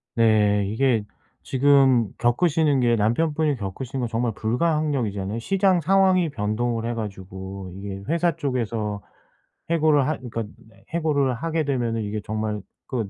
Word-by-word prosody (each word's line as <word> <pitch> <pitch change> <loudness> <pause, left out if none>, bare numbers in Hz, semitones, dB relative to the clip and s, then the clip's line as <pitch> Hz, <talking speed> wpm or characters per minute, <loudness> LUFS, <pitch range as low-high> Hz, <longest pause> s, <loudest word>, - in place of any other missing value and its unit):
네. 105 -3 +3
이게 115 0 +1 0.4
지금 135 -4 +4
겪으시는 145 +2 +2
게 120 -1 +3
남편분이 150 +7 +1
겪으시는 125 +5 -5
건 120 - -2
정말 115 0 -1
불가항력이잖아요. 115 - -1
시장 190 - +2
상황이 185 -1 +3
변동을 115 -1 -2
해 120 - -1
가지고 95 -3 -7
이게 100 0 -7
회사 170 -1 +1
쪽에서 110 -6 -2 0.7
해고를 155 -4 +3
하 155 - -1
그러니까 115 -3 -5 0.5
해고를 145 -6 +1
하게 160 +4 -1
되면은 120 -5 -1
이게 105 +1 -3
정말 110 -1 -3 0.3
그 115 -7 -3
120 Hz, 315 characters per minute, -24 LUFS, 105-150 Hz, 0.7 s, 지금